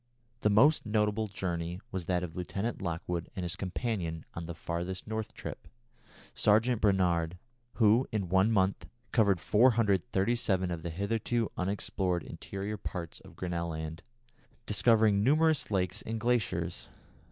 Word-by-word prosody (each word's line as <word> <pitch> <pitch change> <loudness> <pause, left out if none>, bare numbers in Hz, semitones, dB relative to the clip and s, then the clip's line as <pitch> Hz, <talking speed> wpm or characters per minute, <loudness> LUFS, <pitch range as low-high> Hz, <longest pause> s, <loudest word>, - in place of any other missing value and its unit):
The 105 - +2
most 135 +10 +5
notable 105 0 +1
journey 90 -3 -3
was 95 -3 -3
that 90 0 0
of 80 -2 -6
Lieutenant 100 +5 -3
Lockwood 85 -1 -3
and 95 - -3
his 85 -1 -1
companion 95 -5 -3
on 85 -1 -6
the 85 - -5
"farthest 85 +3 -4
North" 110 0 -4
trip, - - -7 0.7
Sergeant 110 +3 +3
Brainard, 90 -4 +2 0.4
who, 115 +3 +4
in 105 -4 -1
one 95 +5 +3
month, 95 -2 +1 0.2
covered 100 -6 +3
437 105 -3 +2
miles 85 - -1
of 80 - -10
the 85 - -4
hitherto 110 +6 -1
unexplored 90 -2 -1
interior 100 +2 -5
parts 90 -4 -6
of - - -15
Grinnel 85 -2 -3
Land, 80 0 -5 0.6
discovering 105 -1 +4
numerous 155 +3 +3
lakes 95 0 0
and 110 0 -4
glaciers. 120 -2 -1
95 Hz, 140 wpm, -31 LUFS, 90-110 Hz, 0.7 s, most